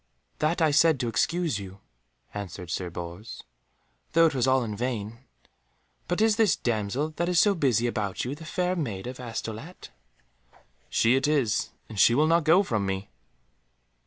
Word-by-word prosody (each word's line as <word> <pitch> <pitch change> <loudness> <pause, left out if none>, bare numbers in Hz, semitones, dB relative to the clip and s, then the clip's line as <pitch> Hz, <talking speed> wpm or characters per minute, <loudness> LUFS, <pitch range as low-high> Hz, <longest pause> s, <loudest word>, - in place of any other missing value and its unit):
"That 165 +3 +1
I 155 - +4
said 150 0 +4
to 120 - -1
excuse 165 - 0
you," 95 0 -10 0.5
answered 90 -3 -7
Sir 90 0 -3
Bors, 85 +5 -8 0.7
"though 165 +1 +6
it 160 - +2
was 130 -1 +1
all 130 -1 +3
in 105 -3 -4
vain. 115 -1 -4 0.9
But 175 +4 -1
is 220 -1 +3
this 215 -8 +4
damsel 120 +6 -1
that 175 +1 0
is 180 - +1
so 205 +1 +5
busy 130 - +1
about 105 -5 -2
you 125 - -3
the 155 +3 -10
Fair 180 +3 -1
Maid 110 - -4
of 125 +1 -7
Astolat?" 115 +6 -7 1.0
"She 115 +3 +3
it 135 +2 +1
is, 140 -8 +1 0.2
and 110 -3 -7
she 115 - +6
will 150 +4 +4
not 165 0 +2
go 175 +5 +5
from 110 - -1
me!" 95 -3 -4
125 Hz, 170 wpm, -27 LUFS, 105-165 Hz, 1.0 s, though